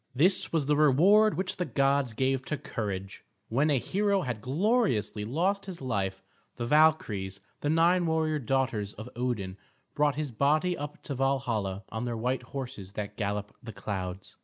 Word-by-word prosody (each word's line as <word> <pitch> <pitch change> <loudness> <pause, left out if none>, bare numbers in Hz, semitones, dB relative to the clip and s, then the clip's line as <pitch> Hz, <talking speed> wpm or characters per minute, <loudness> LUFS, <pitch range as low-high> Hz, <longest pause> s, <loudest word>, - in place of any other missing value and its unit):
This 180 +8 +4
was 160 -4 +1
the 150 +1 +2
reward 180 +10 +5
which 185 0 -2
the 180 - 0
gods 140 -5 +1
gave 130 +2 +1
to 150 - -1
courage. 100 -6 -5 0.3
When 140 +7 +2
a 145 - +3
hero 200 - +1
had 120 -8 -4
gloriously 135 - +1
lost 185 - 0
his 185 -3 -6
life, 100 -7 -2 0.3
the 120 - -3
Valkyries, 120 -10 +2 0.2
the 145 - -1
nine 170 +2 +3
warrior 160 -1 +1
daughters 120 -5 -1
of 110 +3 -9
Odin, 115 -6 -2 0.4
brought 145 -1 +2
his 150 -3 -3
body 155 +9 +2
up 145 -1 -7
to 145 - -4
Valhalla 120 -8 -1
on 110 +3 -4
their 120 -1 -2
white 125 +3 -1
horses 120 -8 -7
that 105 0 -5
gallop 105 -1 -3
the 115 -3 -8
clouds. 95 -1 -5
135 Hz, 165 wpm, -29 LUFS, 105-155 Hz, 0.4 s, reward